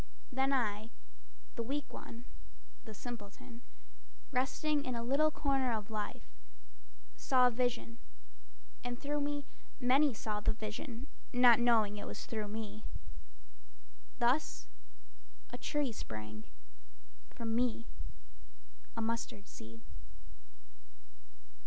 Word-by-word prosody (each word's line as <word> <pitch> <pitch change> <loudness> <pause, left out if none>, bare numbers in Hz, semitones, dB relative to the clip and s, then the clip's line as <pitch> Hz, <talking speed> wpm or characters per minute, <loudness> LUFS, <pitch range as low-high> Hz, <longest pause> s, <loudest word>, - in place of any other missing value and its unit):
Then 265 +1 +3
I, 220 -4 +1 0.6
the - - -2
weak 275 +5 -2
one, 235 +1 -8 0.6
the 220 - -7
simpleton, 235 +2 -7 0.7
Resting 290 +3 +2
in 255 -2 -2
a 235 - -1
little 280 +6 +4
corner 275 -4 +2
of 220 -1 -2
life, 210 -1 -3 0.9
Saw 255 - +5
a 250 - +6
vision, 230 - 0 0.8
and 245 0 -3
through 290 0 0
me 290 0 -1 0.3
many 270 +3 +5
saw 210 -1 -1
the 210 - +3
vision, 225 +3 -5 0.3
Not 245 -2 +8
knowing 225 -4 +5
it 205 - -5
was - - -5
through 215 -2 -2
me. 215 0 -5 1.3
Thus - - +2 0.9
a - - -2
tree 295 -4 +1
sprang 110 - -6 0.8
From 225 -1 -3
me, 235 -1 +2 1.1
a 230 - +1
mustard 225 -3 -2
seed. 115 +1 -10
235 Hz, 110 wpm, -35 LUFS, 215-260 Hz, 1.3 s, Not